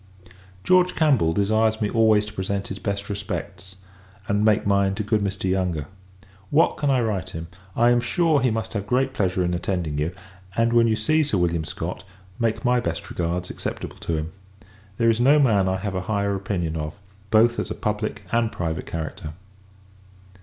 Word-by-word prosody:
George 180 0 +4
Campbell 135 - +3
desires 110 +4 +2
me 105 - +1
always 110 -1 +3
to 105 - -9
present 100 0 -3
his 95 - -5
best 100 0 -3
respects; 95 -1 -5 0.5
and 105 +1 +1
make 110 -1 +3
mine 100 -1 +2
to 105 - -2
good 105 +1 +1
Mr. 95 -1 -2
Yonge. 90 -5 0 0.6
What 155 +3 +3
can 145 - 0
I 130 -2 +3
write 105 -6 -2
him? 80 +1 -7 0.3
I 120 +1 +4
am 120 0 +3
sure, 155 +3 +2
he 130 - +3
must 110 0 -3
have 105 -2 -3
great 130 +2 +1
pleasure 95 -6 0
in 90 - 0
attending 85 -4 -2
you: 75 +3 0 0.5
and, 115 +1 +2
when 115 -1 +5
you 110 - +2
see 155 +9 +2
Sir 145 -9 0
William 85 -2 0
Scott, - - -5 0.4
make 115 +2 0
my 125 0 +4
best 120 - -4
regards 90 +1 -2
acceptable - - -6
to 85 - -3
him. 80 +2 -4 0.7
There 115 -1 +4
is 115 - -1
no 140 +5 +5
man 105 -10 +3
I 95 - 0
have 100 0 -4
a 95 - -1
higher 100 0 -1
opinion 95 -5 -2
of, 75 -1 -4 0.3
both 115 +2 +4
as - - -2
a - - -4
public 105 0 -3
and 115 -1 +1
private 80 -2 -3
character. 80 -1 -5
105 Hz, 190 wpm, -24 LUFS, 95-115 Hz, 0.7 s, when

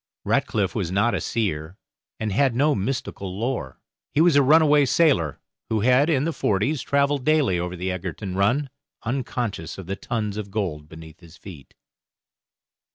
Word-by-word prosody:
Ratcliff - - 0
was - - -2
not 105 +5 +2
a - - -1
seer, 90 -6 -2 0.4
and 110 -1 -2
had 130 +3 +2
no 145 +4 +3
mystical 100 -4 -3
lore. 115 - -3 0.4
He - - +3
was 165 -1 +5
a 145 - +7
runaway 150 0 +5
sailor, 130 - +2 0.3
who 110 -2 0
had, 130 +6 +4
in 140 -4 +2
the 165 +1 -1
forties, 110 +8 0
travelled 140 0 +1
daily 140 - +2
over 90 +1 -3
the 90 +1 -3
Egerton 95 +1 -5
run, 125 +8 +1 0.3
unconscious 120 - -3
of 95 - -8
the 95 +3 -3
tons 105 -2 -3
of 105 -2 -5
gold 85 -8 -3
beneath 80 +1 -12
his 85 -2 -16
feet. 80 -6 -13
110 Hz, 160 wpm, -24 LUFS, 95-140 Hz, 0.4 s, a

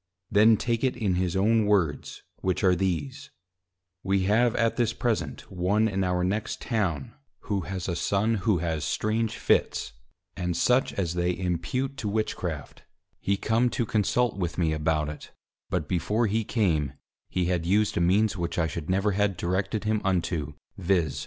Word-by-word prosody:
Then 110 +2 +6
take 115 +2 -1
it 130 -2 +1
in 105 -6 0
his 90 0 0
own 110 +2 +3
Words, 85 -9 0
which 95 -1 -1
are 95 -1 +5
these; 130 - -2 0.7
'We 95 +1 +1
have 110 +4 +3
at 115 -1 +1
this 120 -2 +1
present 120 -4 -1
one 95 +4 +2
in 95 -2 -1
our 90 -1 0
next 105 +4 -1
Town, 95 - -2 0.3
who 100 -2 -2
has 95 -2 -4
a 85 - -1
Son 100 +6 +1
who 105 -3 +2
has 80 -2 -2
strange 110 +1 -1
Fits, - - +1 0.4
and 90 -1 -2
such 125 +2 +3
as 85 -4 -1
they 90 0 0
impute 95 - -2
to 110 -5 -3
Witchcraft: 90 -8 -3 0.4
He 100 0 0
come 115 +4 +2
to 120 - -1
consult 110 +1 +1
with 85 -3 -2
me 80 -3 +1
about 75 0 0
it, 75 - -8 0.4
but 85 -5 -1
before 105 +8 +1
he 110 +2 0
came, 80 - 0 0.4
he 90 -1 0
had 85 -2 -1
used 105 +3 +2
a - - +1
means 100 +5 +3
which 85 -2 -3
I 85 - +2
should 80 +1 -5
never 100 +3 +2
had 100 -1 +1
directed 95 +5 -1
him 110 -1 0
unto, 85 -5 -1 0.3
_viz. 85 -6 +1
95 Hz, 170 wpm, -27 LUFS, 85-110 Hz, 0.7 s, Then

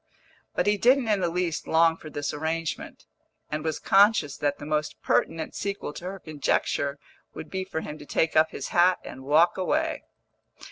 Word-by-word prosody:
But - - +1
he 205 0 +3
didn't 250 +3 +3
in 210 -2 +3
the 175 -2 0
least 175 -2 -2
long 165 0 +4
for 155 - -11
this 145 -1 -3
arrangement, 160 +1 -4 0.5
and 150 0 -2
was 160 -1 -1
conscious 195 -7 +4
that 145 -1 -1
the 145 - -9
most 150 0 -2
pertinent 165 -1 0
sequel 200 -7 -4
to 175 - -9
her 190 +2 -5
conjecture 145 -2 -1 0.4
would - - -8
be 190 0 -2
for 175 -4 -4
him 150 0 -7
to - - -10
take 160 0 0
up 155 0 +5
his - - -6
hat 180 +1 +4
and 130 - -9
walk 160 +7 +3
away. 185 - 0
165 Hz, 185 wpm, -26 LUFS, 150-185 Hz, 0.5 s, up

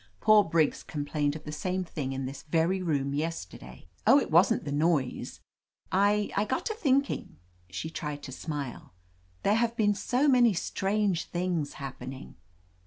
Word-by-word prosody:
"Poor 215 -1 +6
Briggs 165 -3 +1
complained 145 0 -2
of 155 - -8
the 150 - -6
same 185 +4 -2
thing 145 -6 -4
in 135 0 -3
this 135 +1 -6
very 165 +4 +1
room 140 -5 0
yesterday." 90 - -5 0.2
"Oh, 270 +5 +8
it - - -4
wasn't 185 +7 +4
the 145 - -3
noise. 145 -3 0 0.5
I 205 +2 +2
— - - -8
I 205 - +2
got 260 +5 -2
to 440 - -1
think 280 - +2
ing." - - -6 0.3
She 125 - -5
tried 150 -2 -5
to 130 - -7
smile. 140 - -6 0.5
"There 200 - +3
have 230 +1 +1
been 205 -2 +3
so 250 +7 +1
many 245 -6 +5
strange 195 0 0
things 175 -4 -2
happening!" 135 -1 -8
165 Hz, 170 wpm, -29 LUFS, 145-205 Hz, 0.5 s, Oh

